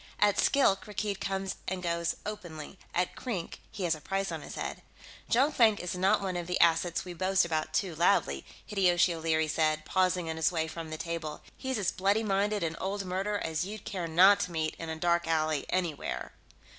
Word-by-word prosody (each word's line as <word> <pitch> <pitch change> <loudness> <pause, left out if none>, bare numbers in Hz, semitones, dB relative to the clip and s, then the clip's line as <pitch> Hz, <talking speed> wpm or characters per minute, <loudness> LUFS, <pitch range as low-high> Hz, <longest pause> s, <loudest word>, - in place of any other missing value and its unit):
At 205 -1 +3
Skilk, 240 -9 +3
Rakkeed 205 -1 -3
comes 195 -1 -2
and 185 -1 -3
goes 170 -1 0
openly; 175 -4 -7
at 180 +1 -1
Krink 195 -10 -4
he 210 -4 -5
has 170 -2 +2
a 155 - -7
price 195 +4 -2
on - - -4
his - - -8
head." - - -4 0.5
"Jonkvank 235 -4 +4
is 180 - -3
not 190 +2 +2
one 185 -2 -2
of 175 -1 -3
the 180 - -1
assets 170 +1 +3
we 180 - -6
boast 185 +1 +2
about 155 -2 -1
too 185 +1 0
loudly," 155 - +2 0.2
Hideyoshi 180 -3 +3
O'Leary 160 -1 +1
said, 155 0 +1
pausing 185 -1 +1
on 160 0 -3
his 160 - +2
way 160 -2 -1
from 160 0 -6
the 155 - -5
table. 165 -2 -4
"He's 260 -2 -3
as 195 -4 +1
bloody 200 +4 +1
minded 205 0 +1
an 165 0 -2
old 195 +1 -2
murderer 195 +3 -1
as 160 +1 -1
you'd 205 +2 -7
care 180 -4 -3
not 190 +5 +6
to 180 - -2
meet 160 -1 -1
in 165 - -5
a 160 - -3
dark 170 +1 +1
alley 155 -2 0
anywhere." 175 -5 -2
180 Hz, 200 wpm, -30 LUFS, 160-195 Hz, 0.5 s, not